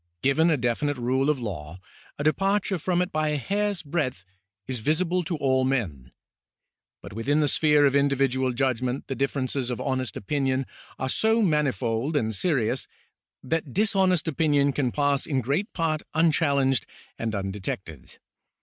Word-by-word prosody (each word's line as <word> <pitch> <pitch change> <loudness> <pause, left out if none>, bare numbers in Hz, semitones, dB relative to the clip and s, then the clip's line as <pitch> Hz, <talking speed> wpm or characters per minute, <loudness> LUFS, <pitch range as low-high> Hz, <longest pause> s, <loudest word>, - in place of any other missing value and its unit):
Given 155 +5 +3
a 160 - +3
definite 130 +4 -1
rule 130 +3 +1
of 150 -3 +1
law, 90 -7 -6 0.4
a 145 - -3
depar 195 +7 +2
ture 190 -4 -2
from 180 +2 +1
it 180 - -6
by 155 0 0
a 150 -1 0
hair's 200 - -1
breadth 140 - -2 0.4
is 130 -2 -4
visible 175 +8 +1
to 170 - -2
all 130 -2 +2
men; 90 - -2 0.9
but - - -9
within 135 +8 0
the 150 - +3
sphere 150 0 +4
of 140 0 +3
individual 135 -2 +2
judgment 125 0 -1
the - - -4
differences 135 -1 -1
of 125 - -3
honest 130 -5 -2
opinion 135 +2 -1 0.3
are 130 - -2
so 220 - +2
manifold 140 - 0
and 110 -4 0
serious 130 - 0 0.6
that 155 0 -2
dishonest 190 -4 +2
opinion 145 -2 +2
can 130 -4 0
pass 145 0 +1
in 140 -4 0
great 145 - -1
part 160 -2 -1
unchallenged 140 - +2 0.3
and 115 -1 -2
undetected. 95 -6 -5
140 Hz, 155 wpm, -26 LUFS, 125-155 Hz, 0.9 s, sphere